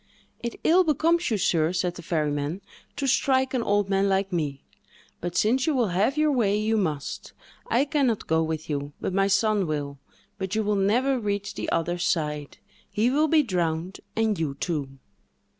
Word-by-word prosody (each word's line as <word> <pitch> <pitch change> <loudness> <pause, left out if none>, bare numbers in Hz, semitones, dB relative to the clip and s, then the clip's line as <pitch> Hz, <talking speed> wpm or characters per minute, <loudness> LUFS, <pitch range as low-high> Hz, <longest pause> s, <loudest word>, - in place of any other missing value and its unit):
"It 235 -1 -5
ill 360 +3 +5
becomes 330 +2 +2
you, 220 - +1
sir," 165 -4 +2
said 180 -1 0
the 175 - -9
ferryman, 150 +1 -1 0.3
"to 280 - -2
strike 265 0 +2
an 255 - +1
old 205 -2 +1
man 195 0 +2
like 195 0 0
me; 145 -5 -2 0.6
but, 175 0 -4
since 250 +6 +2
you 310 - +2
will 240 -5 +2
have 205 +11 +1
your 305 0 +3
way, 210 -7 +2
you 215 +1 +1
must; 155 -9 -3 0.3
I 250 +4 +2
can 285 -2 +1
not 225 -3 -1
go 160 0 +2
with 160 -1 -3
you, 145 -1 -3
but - - -3
my 195 +1 +3
son 200 -1 +2
will; 145 -2 -3 0.4
but 190 +1 -3
you 220 - +1
will 210 0 +1
never 245 +7 +2
reach 200 -2 -2
the - - -4
other 175 +1 0
side; 150 -4 -1 0.3
he 215 +4 +1
will 300 +3 +3
be 310 0 +4
drowned, 175 - -2 0.2
and 220 -4 +1
you 150 -4 -2
too." 140 -3 -3
195 Hz, 190 wpm, -26 LUFS, 160-240 Hz, 0.6 s, ill